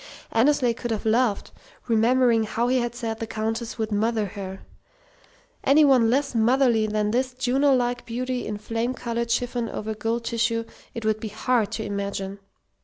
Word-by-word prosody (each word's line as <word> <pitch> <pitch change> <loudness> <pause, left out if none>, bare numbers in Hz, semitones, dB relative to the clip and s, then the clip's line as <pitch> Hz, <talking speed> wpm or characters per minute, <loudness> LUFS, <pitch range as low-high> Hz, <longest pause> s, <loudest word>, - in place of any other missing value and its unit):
Annesley 250 +1 +3
could 240 +1 -5
have 220 -2 -2
laughed, 220 -1 +1 0.4
remembering 230 0 +3
how 230 +2 -1
he 255 0 +3
had 240 -1 -2
said 225 -2 -4
the 225 - -4
Countess 225 +2 -3
would 220 -1 -2
"mother" 215 +1 +1
her. 195 -1 -7 1.0
Any 295 +2 +6
one 255 -5 +5
less 275 +3 +1
motherly 235 -1 +3
than 210 0 0
this 255 +2 0
Juno 270 +2 +2
like 245 -1 -1
beauty 250 +1 -3
in 210 -1 -3
flame 230 +4 -2
coloured 235 -1 -3
chiffon 240 0 -1
over 220 +1 -4
gold 225 +2 -2
tissue 230 0 0 0.3
it 230 -2 -5
would 215 0 +1
be 220 - -5
hard 220 0 0
to 220 - -3
imagine. 200 -1 -4
230 Hz, 170 wpm, -24 LUFS, 220-245 Hz, 1.0 s, Any